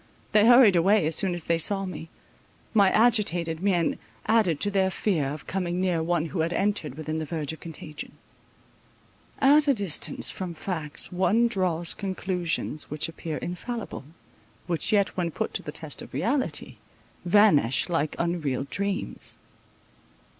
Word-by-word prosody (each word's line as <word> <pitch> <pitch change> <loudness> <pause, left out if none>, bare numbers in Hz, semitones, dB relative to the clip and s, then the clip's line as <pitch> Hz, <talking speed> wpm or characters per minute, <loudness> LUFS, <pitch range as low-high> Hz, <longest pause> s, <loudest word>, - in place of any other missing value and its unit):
They 215 +1 +5
hurried 240 -5 +7
away, 190 +2 +4
as 160 - +1
soon 185 -3 +2
as 175 - -3
they 165 0 0
saw 195 +3 +3
me; 180 -3 -7 0.6
my 200 -4 +5
agitated 180 -8 +2
mien 185 -4 +1 0.3
added 210 -9 +2
to 205 - +1
their 190 -1 +2
fear 180 -7 0
of 150 -1 -7
coming 180 -2 -2
near 180 -3 +1
one 165 0 0
who 165 +2 -5
had 165 +2 0
entered 195 -8 -1
within 155 +1 -4
the - - -3
verge 155 -1 -3
of 160 - -11
contagion. 155 -2 -8 1.2
At 290 +2 +5
a 280 - +4
distance 200 -7 +1
from 180 -3 -6
facts 155 -4 -3
one 200 +6 +2
draws 180 -6 0
conclusions 180 -5 -2
which 150 +1 -2
appear 165 -1 -6
infallible, 205 - -6 0.6
which 170 -2 -1
yet 200 -2 +3
when 175 -2 -1
put - - -4
to - - -3
the 150 - -7
test 150 -1 -7
of - - -10
reality, 235 - -2 0.5
vanish 175 - +4
like 165 -4 -1
unreal 165 -7 -1
dreams. 200 +1 -3
175 Hz, 155 wpm, -26 LUFS, 160-200 Hz, 1.2 s, hurried